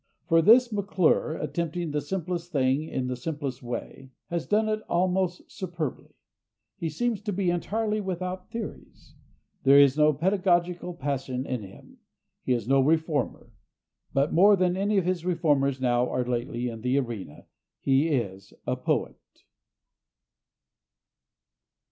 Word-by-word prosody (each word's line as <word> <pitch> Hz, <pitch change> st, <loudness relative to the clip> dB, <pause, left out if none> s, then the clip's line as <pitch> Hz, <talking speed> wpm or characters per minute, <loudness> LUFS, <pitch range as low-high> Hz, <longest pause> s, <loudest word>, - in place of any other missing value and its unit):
For 165 Hz, -1 st, +5 dB
this 235 Hz, +6 st, +6 dB
McClure, 190 Hz, -6 st, +1 dB
attempting 170 Hz, -1 st, -3 dB
the 150 Hz, 0 st, -1 dB
simplest 175 Hz, +1 st, -4 dB
thing 135 Hz, -1 st, +2 dB
in 130 Hz, -5 st, -3 dB
the 125 Hz, 0 st, -2 dB
simplest 140 Hz, -1 st, -4 dB
way, 125 Hz, +2 st, -6 dB, 0.2 s
has 170 Hz, -1 st, -2 dB
done 215 Hz, +1 st, +2 dB
it 215 Hz, 0 st, -1 dB
almost 180 Hz, 0 st, 0 dB
superbly. 175 Hz, -7 st, -5 dB, 0.6 s
He 165 Hz, -, -3 dB
seems 225 Hz, +7 st, -1 dB
to 210 Hz, 0 st, -3 dB
be 185 Hz, -2 st, 0 dB
entirely 215 Hz, +4 st, -1 dB
without 185 Hz, -1 st, -4 dB
theories. 230 Hz, -2 st, -8 dB, 0.5 s
There 135 Hz, +1 st, +6 dB
is 140 Hz, 0 st, +6 dB
no 150 Hz, 0 st, +6 dB
pedagogical 175 Hz, +1 st, 0 dB
passion 135 Hz, -3 st, -3 dB
in 125 Hz, -4 st, -3 dB
him. 95 Hz, -1 st, -14 dB, 0.4 s
He 130 Hz, -, 0 dB
is 120 Hz, -3 st, -2 dB
no 135 Hz, +1 st, +4 dB
reformer. 155 Hz, -1 st, 0 dB, 0.6 s
But 140 Hz, +2 st, +1 dB
more 200 Hz, +5 st, +7 dB
than 180 Hz, -1 st, +1 dB
any 200 Hz, +2 st, +1 dB
of 190 Hz, -, +2 dB
the 180 Hz, -1 st, 0 dB
reformers 145 Hz, -7 st, +1 dB
now 125 Hz, -1 st, +2 dB
or 125 Hz, 0 st, -1 dB
lately 120 Hz, 0 st, -2 dB
in 115 Hz, -2 st, -6 dB
the 125 Hz, +3 st, +1 dB
arena, 115 Hz, -, -4 dB, 0.3 s
he 135 Hz, +3 st, +2 dB
is 100 Hz, -, -2 dB
a -, -, 0 dB
poet. -, -, -1 dB
160 Hz, 140 wpm, -27 LUFS, 130-185 Hz, 0.6 s, more